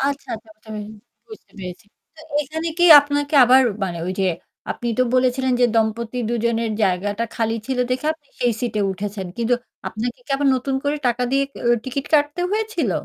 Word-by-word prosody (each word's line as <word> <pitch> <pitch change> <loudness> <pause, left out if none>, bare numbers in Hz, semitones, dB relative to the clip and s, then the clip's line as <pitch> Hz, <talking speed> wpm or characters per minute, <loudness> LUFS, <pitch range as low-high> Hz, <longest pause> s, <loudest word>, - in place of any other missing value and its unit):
আচ্ছা, 280 0 -2
আচ্ছা, 220 0 -11
আচ্ছা, 215 +1 -23 0.6
বুঝতে 435 - -13
পেরেছি। 180 +1 -8 0.3
তো 315 - -15 0.2
এখানে 320 +4 -5
কি 350 - +4 0.2
আপনাকে 290 +1 -2
আবার 260 +2 +6 0.2
মানে 175 -3 -4
ওই 185 - -1
যে - - +2 0.5
আপনি 240 - -3
তো - - +5
বলেছিলেন 255 0 +2
যে, 245 - +6
দম্পতি 225 +2 0
দুজনের 230 -1 0
জায়গাটা 205 +3 0
খালি 225 -1 0
ছিল 260 -1 -2
দেখে 255 +4 -1
আপনি 295 -3 -32
সেই 245 -1 +2
সিট 240 -3 -2
এ - - +2
উঠেছেন। 195 0 -5
কিন্তু 235 +1 +2 0.3
আপনাকে 235 +2 -4
কি - - -14
আবার 280 0 +2
নতুন 265 +2 -2
করে 290 +1 +1
টাকা 245 0 +1
দিয়ে 275 +1 +2 0.4
টিকেট 270 +2 -4
কাটতে 295 +3 +2
হয়েছিল? 440 +1 -1
245 Hz, 180 wpm, -21 LUFS, 225-280 Hz, 0.6 s, আবার